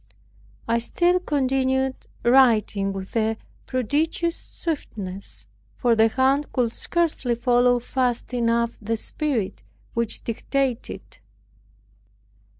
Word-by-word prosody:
I 230 0 +2
still 350 +9 +2
continued 265 -4 +1 0.3
writing 225 -6 +4
with 195 +1 -7
a 220 0 +1 0.3
prodigious 305 +7 0
swiftness; 195 - -6 0.3
for 240 -2 +2
the 225 0 +5
hand 265 +5 +1
could 240 -3 0
scarcely 315 -8 0
follow 245 +1 +3
fast 245 0 -1
enough 235 -1 +1
the 225 +2 -1
Spirit 250 -5 -2 0.3
which 230 -1 -1
dictated. 245 -3 -3
245 Hz, 95 wpm, -24 LUFS, 225-270 Hz, 0.3 s, the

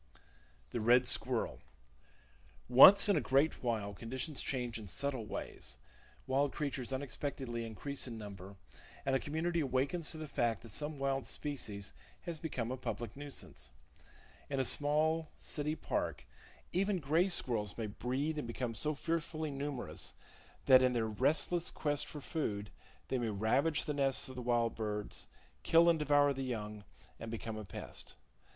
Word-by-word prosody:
The 120 - -1
Red 120 +3 +5
Squirrel. 120 -1 0 1.1
—Once 195 +12 +10
in 200 - +4
a - - +3
great 140 +4 +2
while, 110 -5 -1
conditions 130 +8 -4
change 125 -3 -2
in 105 - -8
subtle 130 +3 -2
ways, 65 -9 -5 0.5
wild 135 +1 +2
creatures 135 -4 -3
unexpectedly 130 -2 -3
increase 130 +6 -3
in 115 -2 -6
number, 100 -2 -8 0.5
and 135 - +2
a - - +3
community 165 +4 -1
awakens 140 +4 0
to - - -5
the 155 -1 -5
fact 115 -5 0
that 115 - -9
some 150 +6 -4
wild 135 -1 0
species 105 -9 -3 0.3
has 170 -3 -4
become 125 -7 -3
a 130 - -2
public 120 -3 -4
nuisance. 140 - -6 0.8
In 140 -1 -1
a 130 - +2
small 155 +4 +2
city 150 +1 -2
park, - - -2 0.5
even 195 +2 +2
gray 165 +4 +2
squirrels 110 - -1
may 115 - -2
breed 130 +9 -2
and 120 - -4
become 115 0 -3
so 150 +8 -1
fearfully 160 0 -2
numerous 140 -2 -3 0.5
that, 130 -1 +8
in 130 -1 +4
their 115 -2 +1
restless 150 +10 +1
quest 145 -2 -1
for 150 - -7
food, 105 -10 -2 0.4
they 130 - +1
may 120 -2 0
ravage 120 +10 +2
the 150 - -1
nests 135 -2 +1
of 130 - -9
the 125 - -4
wild 120 -1 +2
birds, 105 -2 -3 0.3
kill 165 - +6
and 170 -2 +5
devour 145 -1 +4
the 135 - -4
young, 105 -5 -4 0.3
and 115 - -6
become 115 -1 -4
a 110 - -5
pest. 95 - -8
130 Hz, 160 wpm, -35 LUFS, 115-150 Hz, 1.1 s, Once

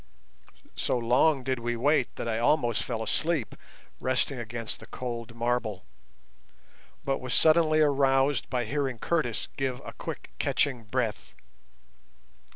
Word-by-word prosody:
So - - 0
long 130 +4 +3
did 130 -1 -1
we 120 0 -2
wait 135 +2 +2
that - - -4
I 110 -1 0
almost 120 -2 +2
fell 115 -3 -3
asleep 155 0 0 0.5
resting 130 +1 0
against 115 -1 -5
the - - -12
cold 120 -2 -5
marble, 115 -5 -1 1.2
but 135 0 0
was 125 -2 -1
suddenly 155 -1 +5
aroused 135 -2 +3
by 125 -2 -1
hearing 135 +1 -1
Curtis 130 -3 -1
give 130 -2 -1
a - - -7
quick - - -7
catching 130 -6 0
breath. 115 0 -2
125 Hz, 130 wpm, -28 LUFS, 115-140 Hz, 1.2 s, suddenly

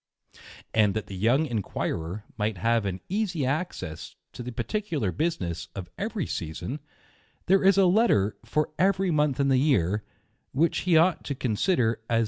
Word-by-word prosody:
— - - -18 0.3
And 105 -2 +3
that 110 -2 -2
the 100 - -8
young 120 +11 +3
inquirer 100 - -3
may 110 0 0
have 115 +2 +1
an 90 -1 -4
easy 190 -7 -1
access 130 - -3 0.2
to - - -7
the 125 +1 -5
particular 140 - -2
business 95 - -2
of 95 -3 -7
every 210 -3 -2
season, 85 - -4 0.7
there 195 +1 +4
is 195 0 +5
a 195 - +6
Letter 175 - +3
^ - - -22
far 150 +6 0
every 190 0 +3
month 150 -4 +1
in 140 0 +3
the 130 -1 +4
year, 105 - +2 0.5
which 165 +5 +2
he 165 - +6
ought 170 +1 +3
to 140 - -3
consider 120 - +1
as - - -1
A - - -8
Aa 110 - -33
ti - - -42
PREFACE. 115 -1 +3
130 Hz, 190 wpm, -27 LUFS, 105-170 Hz, 0.7 s, a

